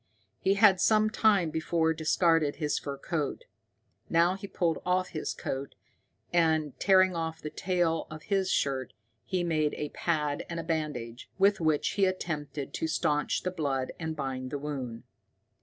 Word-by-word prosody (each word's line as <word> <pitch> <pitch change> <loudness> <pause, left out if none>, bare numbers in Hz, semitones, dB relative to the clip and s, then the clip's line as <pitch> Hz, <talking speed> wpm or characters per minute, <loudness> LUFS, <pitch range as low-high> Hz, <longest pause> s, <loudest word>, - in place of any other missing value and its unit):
He 195 +1 +2
had 200 -3 +5
some 215 0 +4
time 200 -8 +3
before 160 +1 +1
discarded 160 -1 +2
his 150 -1 -1
fur 140 -1 -5
coat. 150 -1 -3 0.6
Now 170 +2 +4
he 195 +1 -7
pulled 170 -4 -1
off 185 0 +1
his 155 - -3
coat, 135 +1 -5 0.6
and, 160 -4 +2
tearing 185 -2 +5
off 160 -1 -3
the 150 - -6
tail 170 -1 0
of 155 0 -9
his 195 -2 0
shirt, 130 -3 0 0.3
he 185 -2 -1
made 155 -3 +1
a 150 - -4
pad 150 -3 -1
and 170 -1 -3
a - - -3
bandage, 150 -8 -3
with 200 +1 +4
which 155 -2 +2
he 200 - +2
attempted 155 -6 -3
to 160 - -1
staunch 150 -2 0
the 185 - -1
blood 140 -6 -1
and 160 -1 -3
bind 130 -3 -4
the 145 - -3
wound. 135 -5 -5
160 Hz, 160 wpm, -29 LUFS, 150-180 Hz, 0.6 s, had